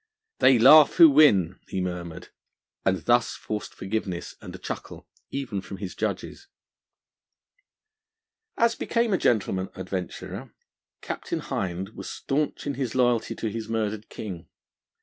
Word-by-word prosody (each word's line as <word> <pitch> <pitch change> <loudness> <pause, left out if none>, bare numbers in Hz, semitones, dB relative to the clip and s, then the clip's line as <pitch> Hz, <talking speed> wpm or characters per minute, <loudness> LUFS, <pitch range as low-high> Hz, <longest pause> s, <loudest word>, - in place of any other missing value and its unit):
'They 130 -1 +6
laugh 150 +6 +8
who 170 - +10
win!' 105 - +5
he 95 - -3
murmured, 90 -1 -5 0.5
and 95 -3 0
thus 120 -1 +3
forced 105 -1 -5
forgiveness 95 -3 -4
and - - -9
a - - -7
chuckle - - -7 0.2
even 130 -8 -3
from 100 - -8
his 95 -2 -6
judges. 110 - -4 2.1
As 235 0 +3
became 230 -2 0
a 185 - +2
gentleman 95 -4 +1
adventurer, 95 -1 -6 0.5
Captain - - -4
Hind 95 +1 -3
was 110 - -8
staunch 150 +2 -2
in 145 - -1
his 130 -3 -3
loyalty 120 -3 +2
to 115 - -3
his 110 0 -5
murdered 110 -1 -2
King. 90 -6 -7
110 Hz, 130 wpm, -26 LUFS, 95-130 Hz, 2.1 s, who